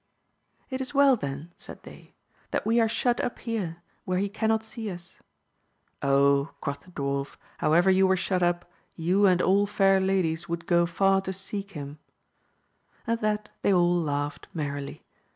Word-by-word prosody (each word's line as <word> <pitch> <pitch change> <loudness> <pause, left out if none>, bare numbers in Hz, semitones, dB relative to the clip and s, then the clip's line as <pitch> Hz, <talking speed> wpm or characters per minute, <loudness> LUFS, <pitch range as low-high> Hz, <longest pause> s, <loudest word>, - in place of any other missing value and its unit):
It 260 0 -2
is 270 +2 -6
well 280 -1 +6
then, 145 - -6
said - - -11
they, - - -14 0.3
that - - -2
we 230 +2 +3
are 225 - +2
shut 240 +2 +1
up - - -3
here, 185 -8 -4 0.2
where 185 0 -1
he 200 +2 0
cannot 220 +1 0
sde 220 0 -6
us. 175 +1 -11 0.8
Oh, 140 +1 +3
quoth 140 -1 -4
the - - -20
dwarf, 140 -4 -3 0.2
however 170 +5 +4
you 190 0 +4
were 190 0 +3
shut 185 0 -1
up, 175 0 +1 0.3
you 185 +5 +3
and 180 -1 +3
all 200 +2 +3
fair 195 -2 +3
ladies 180 -4 0
would 170 0 -3
go 170 -1 +3
far 195 +3 +2
to 190 0 -4
seek 200 +1 -5
him« 145 -1 -7 1.1
At 230 -2 -1
that 210 0 -1
they - - +2
all 175 -1 +4
laughed 145 -3 -2
merrily. 145 -2 -4
185 Hz, 170 wpm, -27 LUFS, 160-205 Hz, 1.1 s, well